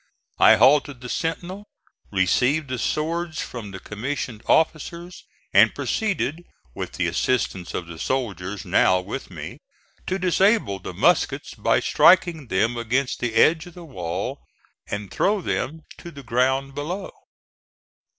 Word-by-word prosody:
I - - +8
halted 140 -1 +4
the 125 - -7
sentinel, 180 - -4 0.4
received 125 +10 +2
the 130 -1 -3
swords 165 +3 -2
from 115 -5 -6
the 95 -1 -8
commissioned 115 +2 -5
officers, 170 +2 0 0.3
and - - +6
proceeded, 175 - -1 0.3
with - - -6
the - - -1
assistance 105 -8 -1
of 90 - -3
the 85 -1 -10
soldiers 105 -7 -3
now 90 - +3
with 90 - -6
me, - - -8 0.5
to 185 - 0
disable 185 - +2
the - - -8
muskets - - +1
by - - +1
striking 170 -5 +4
them 110 +5 +1
against 125 +3 -1
the 120 -2 -2
edge 160 +6 +4
of 175 - -14
the 175 -1 -10
wall, 90 - -4 0.5
and 100 -1 -5
throw 205 +1 +1
them 160 -2 -3 0.2
to 170 - -9
the 140 -4 -11
ground 130 +3 0
below. 175 +8 -5
135 Hz, 140 wpm, -23 LUFS, 110-170 Hz, 0.5 s, I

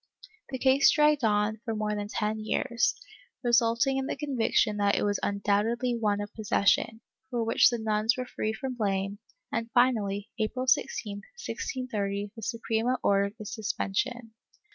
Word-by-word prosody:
The 265 - -3
case 265 +2 +5
dragged 300 -2 +3
on 210 0 +1
for 225 -2 -3
more 210 0 -1
than 205 0 -3
ten 215 +1 -2
years, 235 +2 0 0.5
resulting 235 +2 +3
in 270 0 -2
the - - -2
conviction 250 -6 +1
that 200 -1 +2
it - - 0
was 205 0 +1
undoubtedly 210 +5 0
one 210 -3 0
of 205 0 -6
possession, 220 +1 +1 0.3
for 240 -3 -1
which 225 0 +5
the 240 - -2
nuns 220 +1 +1
were 255 - -3
free 220 -3 -3
from 255 +4 -4
blame, 200 -3 -1 0.3
and 230 0 -2
finally, 215 -4 +2
April 240 +4 -1
16, 210 -4 0
1630, 205 - -4
the 225 - -9
Suprema 230 +2 -1
ordered 200 +1 +2
its 210 -1 -7
suspension. 225 +3 -2
220 Hz, 155 wpm, -28 LUFS, 205-245 Hz, 0.5 s, case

